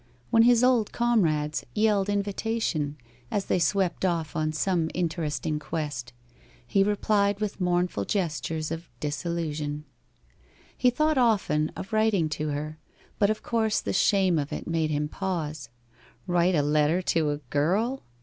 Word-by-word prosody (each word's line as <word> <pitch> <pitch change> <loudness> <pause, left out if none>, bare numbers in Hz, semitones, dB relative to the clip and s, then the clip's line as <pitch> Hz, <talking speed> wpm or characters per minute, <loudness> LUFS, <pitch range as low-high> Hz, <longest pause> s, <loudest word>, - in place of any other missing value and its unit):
When 225 - +6
his 240 0 +5
old 250 -4 +3
comrades 160 -11 +1
yelled 210 -2 +2
invitation, 200 -7 -1 0.3
as 200 - -1
they - - +1
swept 185 +1 +1
off 170 -4 -1
on 155 0 0
some 165 +1 0
interesting 160 -3 -1
quest, 145 -7 -4 0.5
he 195 +10 +3
replied 205 0 +1
with 210 -2 -3
mournful 175 - 0
gestures 160 - -2
of 165 +1 -5
disillusion. 150 -1 -3 0.9
He 250 - +3
thought 305 +3 +1
often 195 -10 +2
of 195 - -7
writing 215 -7 +2
to 155 0 -2
her, 155 +2 -4 0.4
but 200 - +4
of 215 - -2
course 220 -2 +1
the - - -3
shame 190 -5 +3
of 145 0 -3
it - - -4
made 165 -2 0
him 150 0 0
pause. 155 -7 -4 0.6
Write 175 +1 +2
a 150 - +2
letter 150 +4 +2
to 160 -3 +1
a 145 - -1
girl? 200 - +1
175 Hz, 145 wpm, -27 LUFS, 155-205 Hz, 0.9 s, When